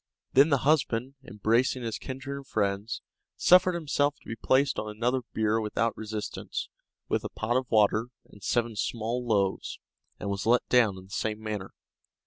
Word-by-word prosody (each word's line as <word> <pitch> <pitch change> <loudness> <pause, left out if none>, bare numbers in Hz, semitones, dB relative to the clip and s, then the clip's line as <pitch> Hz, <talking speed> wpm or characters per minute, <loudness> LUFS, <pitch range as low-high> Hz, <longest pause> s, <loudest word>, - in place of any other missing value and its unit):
Then 140 +4 +6
the 140 - +4
husband, 135 -4 +2
embracing 115 +3 +1
his 115 -2 -3
kindred 135 +1 -6
and 140 -1 -9
friends, 100 +1 -1 0.3
suffered 180 0 +5
himself 145 -3 +1
to - - -21
be 115 - -4
placed 130 +4 +2
on 105 - -4
another 120 +5 0
bier 110 0 +1
without 110 +2 0
resistance, 110 -1 -5 0.4
with - - 0
a - - -4
pot 115 +2 -2
of 130 -1 0
water 110 +1 +3 0.2
and 105 - -17
seven 120 +1 0
small 115 +3 -2
loaves, 100 -5 0 0.4
and - - -5
was 100 +2 -3
let 120 +1 +3
down 115 -6 +4
in 95 - -10
the 95 - -18
same 110 +1 -2
manner. 105 -3 -5
115 Hz, 170 wpm, -28 LUFS, 105-130 Hz, 0.4 s, Then